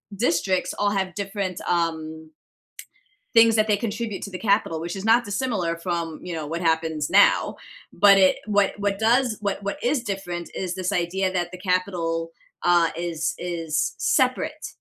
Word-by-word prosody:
districts 185 -3 0
all 205 0 0
have 190 -2 -1
different, 195 -2 -4
um 160 -2 -2 1.0
things 230 -1 +6
that 215 0 +3
they 210 - +3
contribute 220 -1 -4
to 200 - -6
the 185 - -6
capital, 200 -6 +1
which 175 +3 -4
is 195 - -6
not 230 +2 +5
dissimilar 200 -6 -2
from, 170 -2 -3
you 180 - -5
know, 155 -2 -4
what 165 +3 -4
happens 160 -2 0
now, - - +4 0.4
but 200 +1 +6
it 190 -1 +5
what 205 -2 +2
what 200 -1 -1
does 235 0 +2
what 200 -1 -2
what 200 - -3
is 250 0 +1
different 180 -4 -5
is 185 -1 -3
this 185 -1 -2
idea 185 +2 0
that 175 -1 -2
the 185 - -8
capital, 180 -3 -1 0.3
uh, 175 -2 +4
is 170 -2 -2
is 165 -3 -2
separate - - 0
185 Hz, 165 wpm, -24 LUFS, 170-205 Hz, 1.0 s, things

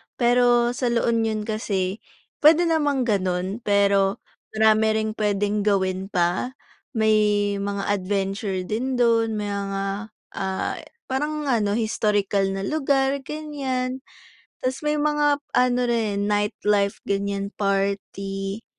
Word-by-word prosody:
Pero 240 0 +3
sa 245 0 -2
La 235 0 +1
Union 225 -2 0
kasi 205 -2 -2 0.4
puwede 315 +3 +6
namang 295 -6 +1
gano'n, 190 -2 -1
pero 200 -2 +2 0.3
marami 220 0 +4 0.2
ring 215 - -2
puwedeng 205 0 0
gawin 190 -1 +1
pa, 180 +7 0 0.4
may 210 -2 +2
mga 200 0 -2
adventure 195 0 -1
din 245 +7 -2
do'n, 230 -2 +2
may 205 -1 -3
mga, 200 +1 -4 0.2
ah, 190 -1 -2 0.3
parang 300 +3 -1
ano, 220 -7 +1
historical 205 -3 +1
na 195 - -3
lugar, 275 +1 +1
ganiyan. 270 -3 -3 0.6
Tas 260 +1 -3
may 300 0 +1
mga 295 -1 +2 0.2
ano 250 0 +3
rin, 215 -4 0
nightlife 205 -1 +1
ganiyan, 200 0 -2
party, 195 +1 -2
210 Hz, 115 wpm, -23 LUFS, 200-250 Hz, 0.6 s, puwede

